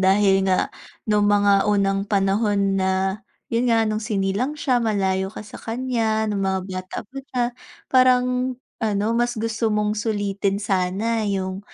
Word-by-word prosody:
dahil 195 0 +4
nga, 185 -1 +1 0.4
nung 210 -1 +3
mga 205 0 +4
unang 195 -1 +1
panahon 200 0 +1
na, 190 +2 0 0.3
yun 235 +2 +1
nga 230 -1 +4
nung 215 0 -1
sinilang 210 +6 -1
siya, 260 -4 +1
malayo 190 -4 0
ka 210 - -8
sa 210 - -11
kanya 225 -2 -1
nung 200 -1 -1
mga 190 0 0
bata 185 -1 -6
pa 270 +6 -10
siya, 255 -2 -2 0.5
parang 255 0 +3 0.3
ano 210 -2 0
mas 240 0 0
gusto 225 0 -1
mong 210 0 +1
sulitin 205 -2 -1
sana 200 +3 0
yung 190 -1 -2
205 Hz, 150 wpm, -22 LUFS, 195-230 Hz, 0.5 s, dahil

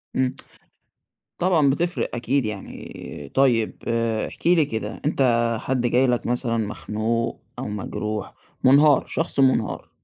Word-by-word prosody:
إمم. 130 -1 +1 1.0
طبعًا 170 -6 +3
بتِفّرق 170 +5 0
أكيد 125 +1 0
يعني 95 -8 -8
طيب 120 -5 +2
آآ 115 -1 0
احكِ - - -6
لي 170 -4 +5
كده، 110 -3 -5
أنت 120 -5 +2
حد 130 -1 -1
جاي 130 +2 +3
لك 120 -1 0
مثلًا 120 -1 0
مخنوق 110 +2 -2 0.2
أو - - -4
مجروح 105 0 -4 0.3
مُنهار، 140 +2 +6
شخص 165 -3 -2
مُنهار، 130 -5 +2
120 Hz, 125 wpm, -23 LUFS, 110-135 Hz, 1.0 s, مُنهار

